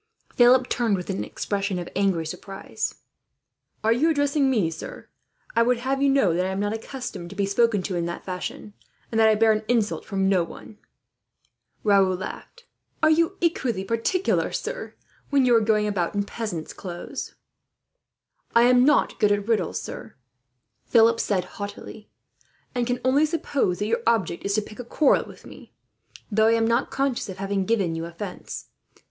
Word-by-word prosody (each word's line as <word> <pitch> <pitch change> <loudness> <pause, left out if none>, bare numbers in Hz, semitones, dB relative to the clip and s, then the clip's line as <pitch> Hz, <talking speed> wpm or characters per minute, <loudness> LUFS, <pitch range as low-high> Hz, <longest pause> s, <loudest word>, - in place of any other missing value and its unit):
Philip 250 +1 +5
turned, 230 -6 +1
with 180 +2 -4
an 195 - -2
expression 200 -2 -3
of 175 - -5
angry 190 -4 +1
surprise. 195 +5 -5 0.9
"Are 225 +1 +4
you 290 +8 +2
addressing 285 -2 +2
me, 205 -11 +1
sir? 160 - -8 0.5
I 230 - +4
would 245 +1 +3
have 265 +3 -1
you 280 - +4
know 270 -11 +3
that 180 +2 +1
am 190 +1 -3
not 205 +1 0
accustomed 225 -6 -6
to 200 - -10
be 200 0 0
spoken 205 0 +2
to, 185 - -3
in 170 -1 -1
that 170 - -6
fashion; 185 +3 -6 0.4
and 225 - 0
that 220 0 +6
I 215 - +4
bear 220 +1 +4
an 215 0 +1
insult 225 -3 +1
from 195 -2 -1
no 190 -3 +3
one." 210 +5 -11 1.0
Raoul 195 -3 +4
laughed. 480 - -8 0.4
"Are 315 - +6
you 335 +4 +2
equally 255 - 0
particular, 230 - 0
sir, - - -5 0.3
when 275 -2 +3
you 245 -1 +5
are - - +6
going 215 -1 +2
about 200 -3 -1
in 200 - +1
peasant's 200 -6 -5
clothes?" 175 -2 -7 1.2
"I 235 - +7
am 250 0 +5
not 295 +2 +3
good 210 - +4
at 205 0 0
riddles, 210 -7 0
sir," 110 - -8 0.7
Philip 230 0 +5
said 190 -3 0
haughtily, 205 +1 -8 0.6
"and 245 -2 -1
can 245 0 -1
only 280 +4 +4
suppose 285 - -1
that 205 - -2
your 230 +2 0
object 225 -7 +1
is 200 0 +1
to 215 - +1
pick 215 - -13
a - - -4
quarrel 275 +4 +2
with - - -14
me; - - -14 0.6
though 220 +1 +4
I 225 - +4
am 225 0 +2
not 235 +3 +1
conscious 270 -5 -1
of 190 - -7
having 195 0 -1
given 195 -6 +1
you 165 0 -4
offence. 180 +3 -7
215 Hz, 180 wpm, -24 LUFS, 195-245 Hz, 1.2 s, I